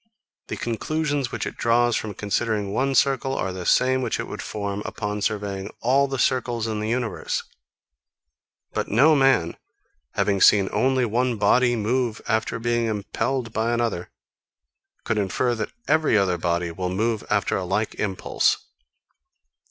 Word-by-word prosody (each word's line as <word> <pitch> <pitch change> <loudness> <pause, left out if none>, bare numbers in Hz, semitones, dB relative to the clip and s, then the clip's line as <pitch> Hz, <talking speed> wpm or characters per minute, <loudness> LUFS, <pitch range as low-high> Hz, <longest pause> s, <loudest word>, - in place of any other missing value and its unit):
The - - -4
conclusions 145 +3 -2
which - - -3
it - - -6
draws 120 0 +3
from 105 -3 -3
considering 105 0 -1
one 135 +3 +1
circle 135 -1 +2
are 95 -7 -2
the 90 -1 -5
same 130 +1 +3
which 120 -3 -1
it - - -3
would - - -6
form 100 -1 -4
upon 105 -2 -4
surveying 100 -2 -2
all 135 +4 +3
the 135 0 -3
circles 120 -2 0
in 110 -2 -2
the 105 +1 -2
universe. 120 -3 -2 1.3
But - - -1
no 145 +9 +5
man, 135 - +3 0.6
having 100 -2 +1
seen 100 -2 +6
only 130 -1 +2
one 120 +1 0
body 120 +4 +3
move 115 +1 0
after 110 0 0
being 120 0 0
impelled 115 +3 -2
by 115 +1 0
another, 115 -7 -1 0.9
could 110 - 0
infer 105 +5 0
that 110 -2 -3 0.2
every 155 -7 +3
other 95 -4 +1
body 85 0 -1
will 90 +2 -3
move 110 +4 -1
after 100 -4 +1
a 95 - -1
like 95 +4 -1
impulse. 95 -3 +1
115 Hz, 150 wpm, -24 LUFS, 100-125 Hz, 1.3 s, seen